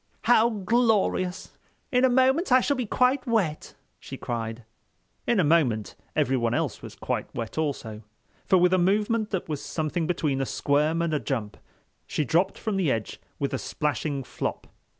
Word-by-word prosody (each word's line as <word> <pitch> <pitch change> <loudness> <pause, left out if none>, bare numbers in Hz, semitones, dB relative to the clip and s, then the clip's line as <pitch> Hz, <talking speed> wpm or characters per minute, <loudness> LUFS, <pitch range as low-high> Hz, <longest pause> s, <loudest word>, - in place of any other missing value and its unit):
"How 235 -1 +5
glorious! 210 -4 0 0.3
In 250 -1 +3
a 260 - +6
moment 265 +6 +3
I 255 - +7
shall 285 +3 +1
be 250 -4 -3
quite 255 +4 +2
wet," 195 -10 -1 0.2
she - - -8
cried. 115 0 -4 0.6
In 235 - +3
a - - +4
moment 140 -9 +2 0.2
everyone 125 -5 +1
else - - -2
was - - -9
quite - - -3
wet 115 -2 -5
also—for 115 - -3
with 180 +1 +4
a 185 - +4
movement 210 +4 +1
that 190 -4 -3
was 150 -3 -4
something 160 +1 -2
between 150 -6 0
a - - 0
squirm 150 +4 +1
and 165 -2 -1
a 150 - +1
jump, 115 -9 -3 0.5
she 150 - -1
dropped 165 +6 +1
from 215 -3 -2
the 175 -8 +2
edge 110 -1 -3 0.2
with 140 - -2
a - - -1
splashing 150 -2 -2
flop. - - -4
165 Hz, 170 wpm, -26 LUFS, 140-220 Hz, 0.6 s, I